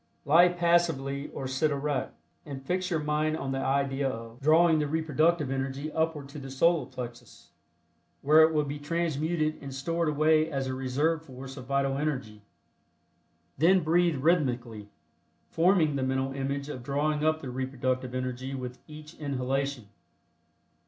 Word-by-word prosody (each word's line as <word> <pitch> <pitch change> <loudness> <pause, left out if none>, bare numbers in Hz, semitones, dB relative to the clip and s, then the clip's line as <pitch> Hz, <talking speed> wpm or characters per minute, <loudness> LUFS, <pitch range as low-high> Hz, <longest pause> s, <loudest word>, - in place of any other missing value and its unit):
Lie 165 +5 +7
passively 170 -6 +1
or 135 - -5
sit 130 +4 +1
erect, 140 - -2 0.3
and 135 -3 -8
fix 185 +3 -1
your 165 -4 0
mind 150 +1 0
on 135 -3 -4
the 135 - -1
idea 140 0 0
of 115 0 -8
drawing 160 +2 +5
the 150 - 0
reproductive 155 -1 +1
energy 135 +3 -3
upward 160 -3 -1
to 150 - -8
the 135 -1 -8
Solar 165 +5 +2
Plexus, 125 -3 -9 0.7
where 155 +3 +6
it 160 0 +6
will 150 -1 +1
be 145 0 -5
transmuted 155 0 -1
and 140 - -7
stored 165 +4 -1
away 155 +1 +3
as 135 -3 -2
a 130 - -3
reserve 145 +5 0
force 135 -2 -10
of 130 -3 -10
vital 140 0 0
energy. 125 -8 -3 1.2
Then 180 +4 +5
breathe 170 +1 +3
rhythmically, 125 -8 0 0.6
forming 165 -3 +3
the 135 - -1
mental 130 +1 -1
image 140 +1 -3
of 140 -4 -6
drawing 150 +3 -1
up 155 0 +2
the 130 - -5
reproductive 130 -1 -2
energy 130 +1 -3
with 125 -1 -6
each 155 0 -11
inhalation. 135 -3 -2
140 Hz, 150 wpm, -28 LUFS, 130-155 Hz, 1.2 s, Lie